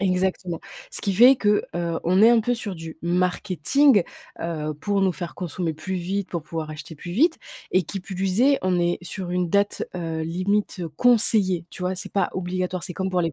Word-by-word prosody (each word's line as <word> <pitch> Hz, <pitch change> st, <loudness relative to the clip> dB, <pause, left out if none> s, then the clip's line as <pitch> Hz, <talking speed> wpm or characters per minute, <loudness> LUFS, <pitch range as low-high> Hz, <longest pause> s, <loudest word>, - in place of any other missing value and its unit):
Exactement. 185 Hz, -2 st, -1 dB, 0.3 s
Ce -, -, -4 dB
qui 200 Hz, -, -1 dB
fait 245 Hz, +7 st, +7 dB
que, 210 Hz, -3 st, +2 dB
heu, 170 Hz, -1 st, -2 dB
on 185 Hz, +3 st, +3 dB
est 225 Hz, -, +9 dB
un 235 Hz, -1 st, +5 dB
peu 245 Hz, +3 st, 0 dB
sur 220 Hz, -5 st, -5 dB
du 165 Hz, -1 st, -9 dB
marketing, 185 Hz, -, +2 dB, 0.4 s
heu, 155 Hz, -2 st, -3 dB
pour 200 Hz, +3 st, 0 dB
nous 190 Hz, -, +3 dB
faire 175 Hz, -1 st, -7 dB
consommer 175 Hz, -1 st, -3 dB
plus 190 Hz, +5 st, -5 dB
vite, 190 Hz, +2 st, -3 dB
pour 170 Hz, -3 st, -3 dB
pouvoir 160 Hz, 0 st, -5 dB
acheter 155 Hz, +2 st, -9 dB
plus 175 Hz, +3 st, -8 dB
vite. 320 Hz, -, +3 dB, 0.3 s
Et 185 Hz, -, +4 dB
qui 195 Hz, +4 st, -6 dB
plus 190 Hz, +2 st, -2 dB
est, 275 Hz, +1 st, +4 dB
on 185 Hz, -1 st, +1 dB
est 175 Hz, 0 st, +1 dB
sur 180 Hz, 0 st, -6 dB
une 180 Hz, -1 st, 0 dB
date, 200 Hz, +2 st, +1 dB
heu, 165 Hz, -2 st, -3 dB
limite, 185 Hz, +4 st, -1 dB, 0.2 s
conseillée, 210 Hz, -7 st, +5 dB
tu -, -, -12 dB
vois, 180 Hz, +1 st, -1 dB
c'est 185 Hz, -, -3 dB
pas 200 Hz, -, +1 dB
obligatoire. 185 Hz, 0 st, -3 dB
C'est 180 Hz, -, -3 dB
comme 190 Hz, -1 st, -2 dB
pour 180 Hz, -1 st, +1 dB
les 165 Hz, -1 st, -1 dB
185 Hz, 205 wpm, -23 LUFS, 170-200 Hz, 0.4 s, est